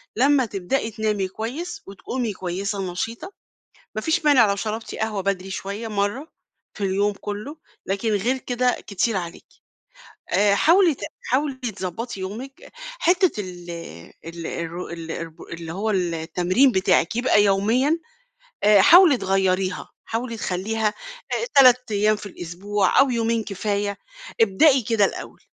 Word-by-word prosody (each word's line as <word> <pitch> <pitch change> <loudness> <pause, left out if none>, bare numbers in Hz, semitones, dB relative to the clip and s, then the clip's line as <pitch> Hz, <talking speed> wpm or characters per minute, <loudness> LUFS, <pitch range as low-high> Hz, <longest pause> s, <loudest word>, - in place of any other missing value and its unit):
لمّا 270 +2 +4
تبدئي 220 +4 -2
تنامي 210 -3 -1
كويس 245 - -5
وتقومي 225 +3 -4
كويسة 190 +1 -3
نشيطة. 230 - -5 0.6
ما 215 - -2
فيش 320 +5 0
مانع 265 -7 +6
لو 200 - +1
شرَبتِ 220 +2 -4
قهوة 220 -2 -2
بدري 190 -1 -2
شوية، 200 +4 -5
مرّة 210 +7 -2 0.5
في 210 - -4
اليوم 200 +2 +1
كلّه، 210 +9 -6 0.3
لكن 200 +4 -1
غير 220 +6 +1
كده 250 0 0
كتير 205 +1 0
عليكِ. 170 -2 -6 0.8
آآ، 200 0 +3
حاولِي 340 - +5
ت - - -23 0.3
حاولِي 275 +2 0 0.2
تضبّطِ 200 +4 -5
يومِك. 220 +9 -8 0.3
حِتّة 360 +1 +3
ال 180 -2 -9
آآ، 165 - -9
ال 165 0 -7
الر 170 +2 -5
ال 165 -1 -7 0.4
اللي 165 -1 -7
هو 210 +4 -2
التمرين 180 +6 +1
بتاعِك 190 -2 +2
يبقى 235 -4 +3
يوميًا، 225 +11 +2 0.7
آآ، 205 -1 +7
حاولي 335 - +7
تغيّريها، 190 -2 0 0.2
حاولي 230 +1 -4
تخلّيها 215 +3 -1 0.4
أ 470 - -1
3 250 -3 +6
أيام 210 +1 +3
في 205 - -9
الأسبوع، 190 +3 0
أو 270 -1 +4
يومين 230 -1 0
كفاية. 200 0 -2 0.4
ابدئي 245 +6 +5
كده 220 -1 +2
الأول. - - -4
210 Hz, 135 wpm, -23 LUFS, 190-245 Hz, 0.8 s, آآ